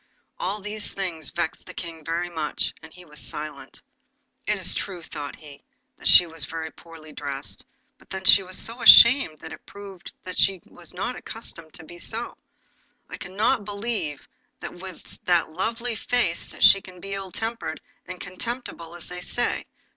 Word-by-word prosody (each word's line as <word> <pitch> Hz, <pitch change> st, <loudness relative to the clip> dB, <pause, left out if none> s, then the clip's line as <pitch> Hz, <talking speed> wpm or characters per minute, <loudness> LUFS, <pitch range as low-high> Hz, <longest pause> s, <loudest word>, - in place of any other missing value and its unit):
All 215 Hz, -, -1 dB
these 210 Hz, +1 st, -4 dB
things 175 Hz, -6 st, -3 dB
vexed 170 Hz, -2 st, -3 dB
the -, -, -9 dB
King 165 Hz, -2 st, -6 dB
very 170 Hz, +2 st, -1 dB
much, 160 Hz, -3 st, -2 dB
and 160 Hz, 0 st, -12 dB
he 180 Hz, +1 st, -13 dB
was 150 Hz, -2 st, -11 dB
silent. 150 Hz, +3 st, -6 dB, 0.6 s
'It -, -, +2 dB
is -, -, +3 dB
true,' 180 Hz, -4 st, -4 dB
thought 145 Hz, -3 st, -6 dB
he, 145 Hz, -3 st, -13 dB, 0.3 s
'that -, -, -4 dB
she 180 Hz, -, +9 dB
was 165 Hz, -2 st, -5 dB
very 160 Hz, -1 st, -5 dB
poorly 160 Hz, -2 st, -13 dB
dressed, 140 Hz, -1 st, -5 dB, 0.4 s
but -, -, -21 dB
then 190 Hz, -2 st, -4 dB
she 200 Hz, -, +9 dB
was 185 Hz, 0 st, -5 dB
so 235 Hz, +2 st, -3 dB
ashamed 235 Hz, -, +9 dB
that -, -, -8 dB
it -, -, -11 dB
proves 200 Hz, -2 st, -10 dB, 0.2 s
that 185 Hz, -, -5 dB
she 195 Hz, -1 st, +3 dB
was 175 Hz, -1 st, -13 dB
not 200 Hz, +7 st, -3 dB
accustomed 165 Hz, -8 st, -9 dB
to 160 Hz, -, -10 dB
be 175 Hz, +2 st, -12 dB
so. 225 Hz, +6 st, -3 dB, 0.8 s
I -, -, -5 dB
cannot 210 Hz, +6 st, +1 dB
believe 200 Hz, -7 st, -3 dB, 0.3 s
that -, -, -6 dB
with 185 Hz, 0 st, -9 dB
that 175 Hz, -3 st, +3 dB
lovely 230 Hz, +6 st, -1 dB
face 225 Hz, -6 st, 0 dB
she 195 Hz, -, +8 dB
can 185 Hz, -1 st, -12 dB
be 195 Hz, +2 st, -7 dB
as -, -, -1 dB
ill 195 Hz, -1 st, -6 dB
tempered 230 Hz, +3 st, -3 dB, 0.3 s
and 185 Hz, -1 st, -7 dB
contemptible 185 Hz, -4 st, -5 dB
as 175 Hz, -, -9 dB
they 180 Hz, 0 st, -6 dB
say. 240 Hz, +7 st, 0 dB
180 Hz, 175 wpm, -25 LUFS, 165-205 Hz, 0.8 s, she